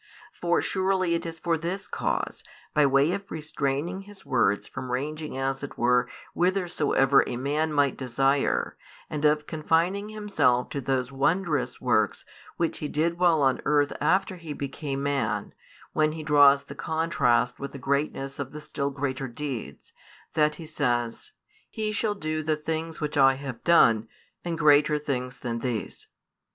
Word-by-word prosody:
For 175 0 0
surely 190 -2 +1
it 170 +1 -1
is 165 0 -7
for 165 -1 0
this 180 +4 -4
cause, - - -2 0.3
by 150 -2 +4
way 135 +4 +3
of 200 +1 -4
restraining 155 +3 -2
His 200 0 -13
words 100 +1 +1
from 130 -1 -6
ranging 150 +3 -3
as 135 0 -1
it 145 - -7
were 125 +1 +3 0.2
whithersoever 170 -7 +3
a - - -3
man 150 +5 0
might 145 -3 +2
desire, 135 +2 +1 0.4
and 150 -1 -3
of 150 0 +3
confining 170 +6 0
Himself 205 -13 +1
to 140 - -3
those 130 0 -1
wondrous 150 +1 0
works - - +1 0.3
which 170 -1 -1
He 150 - -3
did 165 +4 0
while 170 -5 +4
on 135 -1 +2
earth 145 -1 +2
after 190 0 +2
He 165 -3 -7
became 140 0 -4
man, 140 -1 -1 0.4
when 155 0 +2
He 160 -1 -6
draws 145 -2 +6
the 140 - -9
contrast 140 -6 +1
with 140 0 -5
the - - -8
greatness 140 0 -2
of 135 0 -5
the 150 - -7
still 140 -1 -3
greater 135 -1 -3
deeds, 130 -2 -6 0.4
that 150 -1 +2
He 165 - -9
says: 120 - -1 0.4
"He 215 -2 -2
shall 210 0 0
do 155 -4 -2
the 155 0 0
things 160 +1 -4
which 150 -1 -2
I 135 -1 +6
have 135 -3 -7
done, 115 -10 +5 0.4
and 170 -1 -3
greater 150 -1 +5
things 125 -4 -3
than 115 -2 -3
these." 115 -4 -4
150 Hz, 160 wpm, -26 LUFS, 135-165 Hz, 0.4 s, draws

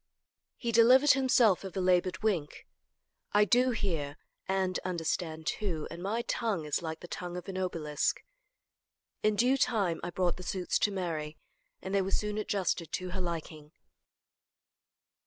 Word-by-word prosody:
He 235 - -2
delivered 250 +5 +7
himself 250 -8 +4
of 190 0 -7
a - - +1
labored 180 0 +2
wink. 175 -9 -1 0.7
"I 210 0 +5
do 250 +4 +4
hear 165 - -2 0.3
and 190 -1 0
understand, 165 -2 -3
too, 165 -4 -2
and 170 - -7
my 220 +5 -1
tongue 215 -9 -1
is 150 +2 -1
like 160 -1 -5
the - - -9
tongue 175 0 -5
of 180 - -8
an 190 - -5
obelisk." 160 -5 -1 1.0
In 215 0 +2
due 250 +5 +3
time 205 -10 +1
I 175 - -2
brought 175 0 0
the - - -8
suits 180 0 -1
to 205 - +2
Mary, 160 -5 -3 0.5
and 190 - -4
they 200 - +3
were 190 - -2
soon 210 +1 -1
adjusted 185 -6 -1
to 185 0 -3
her 190 +1 -3
liking. 160 -3 -5
185 Hz, 155 wpm, -30 LUFS, 170-210 Hz, 1.0 s, delivered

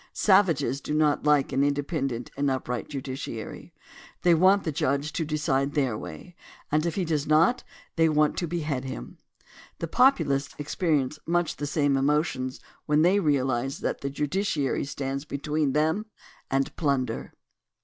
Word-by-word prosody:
Savages 165 - +3
do 150 - -3
not 150 -1 +2
like 145 -2 +3
an 135 +1 +2
independent 140 -4 -1
and 140 0 +1
upright 125 -1 -3
judiciary. 130 -5 -6 0.5
They 175 -1 +6
want 190 +4 +4
the 160 - -1
judge 140 +2 -1
to 165 - -1
decide 145 -3 0
their 135 -6 +1
way, 175 +10 -9 0.4
and 155 +3 +2
if 170 - -2
he 190 - 0
does 155 -3 -1
not, 165 +11 +3 0.3
they 165 0 +4
want 150 0 +2
to 175 - -1
behead 150 -5 -2
him. 95 - -7 0.6
The 165 - -4
Populists 155 - +2
experi 150 +1 0
ence 150 +4 -7
much 175 0 0
the 145 - -3
same 145 -1 +1
emotions 135 -2 0 0.3
when 150 +1 +3
they 185 +4 +4
realize 135 -5 0
that - - -2
the 140 - -2
ju 145 +2 -2
diciary 150 -6 -1
stands 135 -1 -3
between 150 -1 -1
them 160 +8 +1 0.4
and 135 0 0
plunder. 135 -7 -1
150 Hz, 160 wpm, -26 LUFS, 135-160 Hz, 0.6 s, They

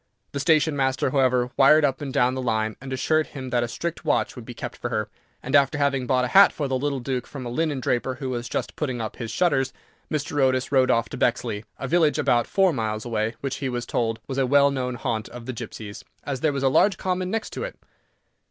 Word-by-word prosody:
The 140 - -3
station 155 0 +3
master, 130 -1 +1
however, 125 -2 +2
wired 150 +3 +6
up 135 +1 -1
and 140 -2 -4
down 125 0 +2
the 130 - -3
line, 110 -3 0
and 135 0 -8
assured 155 +4 +1
him 130 -3 -7
that 120 0 +2
a 120 - -1
strict 170 +8 -4
watch - - +1
would 125 -3 -9
be 120 - -9
kept - - -6
for 120 - -4
her, 110 -3 -2 0.3
and, 135 +3 0
after 140 +1 +4
having 140 -3 +1
bought 125 -1 +2
a - - -3
hat 200 +6 +7
for 145 - -3
the 130 - -1
little 140 +1 -1
Duke 125 0 -3
from 135 -3 -7
a - - -4
linen 150 +1 0
draper, 125 +1 -1
who 130 0 -4
was 120 -1 -4
just - - -3
putting 130 -5 -2
up 110 -2 -5
his 115 - -5
shutters, 135 -1 +1 0.4
Mr. 145 -1 -1
Otis 130 -1 +2
rode 130 -2 +4
off 115 -1 +2
to - - -6
Bexley, 115 -3 0
a 135 - -4
village 160 -1 +3
about 120 -6 +2
four 190 -3 +3
miles 110 -3 -2
away, 115 -1 -1
which 135 -1 -3
he 135 -1 -2
was 120 -1 -3
told 115 -1 -1
was 135 0 -3
a 130 - +2
well 140 +1 +5
known 125 -2 -2
haunt 115 -3 -3
of 120 -1 -10
the 130 - -4
gipsies, 105 -2 -8 0.2
as 140 -3 -3
there 155 +2 +2
was 140 -1 -3
a - - +4
large 190 +9 +4
common 185 0 -1
next 220 +2 -3
to - - -5
it. - - -6
130 Hz, 245 wpm, -24 LUFS, 120-145 Hz, 0.4 s, hat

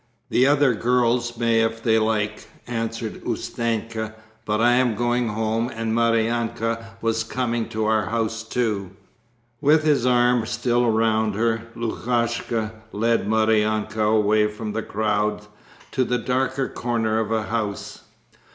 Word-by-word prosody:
"The 130 - +4
other 145 -3 +4
girls 120 0 +1
may 115 -1 +2
if 115 0 -1
they 110 -1 +3
like," 105 -1 -1 0.2
answered 115 -1 -4
Ustenka, 115 -1 -3 0.3
"but 105 0 0
I 120 +1 +4
am 120 -2 +3
going 120 +2 0
home 110 +2 -1
and 115 0 -2
Maryanka 115 0 0 0.2
was 115 0 +1
coming 120 0 -2
to 110 0 -2
our 110 -2 +1
house 115 0 -1
too." 110 -5 -2 0.7
With 155 +2 +4
his 150 -5 +3
arm 125 -2 +3
still 120 0 +1
round 110 -1 +2
her, 115 +1 0
Lukashka 115 -1 -1 0.2
led 115 0 +1
Maryanka 110 0 +1
away 105 0 +3
from 105 0 -5
the 110 - -1
crowd 105 -1 -1 0.5
to 130 - +1
the 125 0 0
darker 130 +3 -1
corner 115 -2 -1
of 110 0 -2
a 110 -1 +1
house. 110 -3 -4
115 Hz, 135 wpm, -23 LUFS, 110-120 Hz, 0.7 s, The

